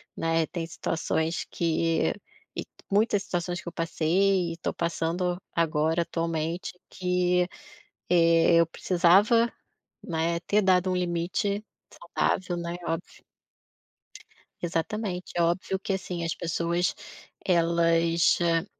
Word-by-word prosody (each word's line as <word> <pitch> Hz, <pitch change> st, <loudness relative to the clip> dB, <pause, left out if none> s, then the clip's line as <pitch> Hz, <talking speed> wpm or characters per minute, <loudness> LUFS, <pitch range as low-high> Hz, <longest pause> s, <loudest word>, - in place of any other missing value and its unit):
né, 165 Hz, 0 st, +1 dB
tem 170 Hz, 0 st, -4 dB
situações 160 Hz, 0 st, -2 dB
que 165 Hz, 0 st, +1 dB, 0.4 s
e -, -, -3 dB, 0.3 s
muitas 205 Hz, 0 st, +2 dB
situações 175 Hz, 0 st, -3 dB
que -, -, -17 dB
eu -, -, -3 dB
passei 170 Hz, +2 st, +1 dB
e -, -, -10 dB
tô -, -, -2 dB
passando 170 Hz, +2 st, -1 dB
agora 160 Hz, 0 st, +1 dB
atualmente 165 Hz, +2 st, -3 dB
que, 180 Hz, -1 st, +1 dB, 0.6 s
eh, 165 Hz, -1 st, +5 dB
eu 170 Hz, -, +4 dB
precisava, 190 Hz, +8 st, +3 dB, 0.6 s
né, 170 Hz, 0 st, 0 dB
ter 210 Hz, -, +3 dB
dado 185 Hz, -1 st, +3 dB
um -, -, 0 dB
limite 180 Hz, +4 st, -1 dB, 0.3 s
saudável, 175 Hz, +1 st, -1 dB
né, 170 Hz, 0 st, -4 dB
óbvio. 165 Hz, +2 st, -5 dB, 1.4 s
Exatamente. 180 Hz, +2 st, -3 dB
É 175 Hz, -, +2 dB
óbvio 175 Hz, +3 st, 0 dB
que 195 Hz, -, -2 dB
assim, 180 Hz, -2 st, -4 dB
as 165 Hz, -, -2 dB
pessoas 170 Hz, +1 st, 0 dB, 0.5 s
elas, 170 Hz, -1 st, +3 dB
hã, 165 Hz, -1 st, +2 dB
170 Hz, 115 wpm, -27 LUFS, 165-180 Hz, 1.4 s, eh